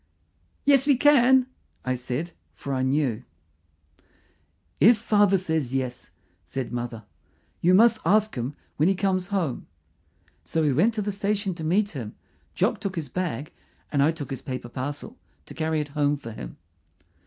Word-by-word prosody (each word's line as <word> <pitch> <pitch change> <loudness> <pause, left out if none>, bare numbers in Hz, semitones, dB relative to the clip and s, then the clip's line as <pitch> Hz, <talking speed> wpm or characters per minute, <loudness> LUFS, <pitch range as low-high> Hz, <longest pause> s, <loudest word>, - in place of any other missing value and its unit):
"Yes, 280 -1 +5
we 285 - +6
can," 265 -2 +5 0.4
I 130 - +1
said, 130 +7 -4 0.2
for 140 - -5
I 130 - 0
knew. 130 -3 0 1.6
"If 230 +2 +7
father 205 -2 +3
says 160 -8 -1
yes," 130 -2 -3 0.3
said 130 -2 -5
mother. 120 -2 -4 0.6
"You 180 +2 +5
must 225 +2 +5
ask 215 +5 +3
him 125 +3 -4 0.2
when 155 +5 +3
he 195 - +2
comes 185 -1 0
home." 185 -10 -2 0.8
So 160 -1 -1
we 145 -3 +2
went 210 - +3
to 210 - -1
the 205 - -2
station 200 0 -1
to 165 -2 -8
meet 200 +6 +1
him. 120 -8 -7 0.4
Jock - - +1
took 195 -1 -4
his 155 -5 -4
bag, 155 -4 -3 0.4
and 140 - +2
I 150 +3 +4
took 150 -3 -7
his 135 - -4
paper 130 -3 -6
parcel 145 - -6 0.3
to - - -11
carry 160 -1 -1
it 150 -1 -3
home 145 0 +1
for 115 -5 -9
him. - - -9
160 Hz, 165 wpm, -25 LUFS, 130-200 Hz, 1.6 s, If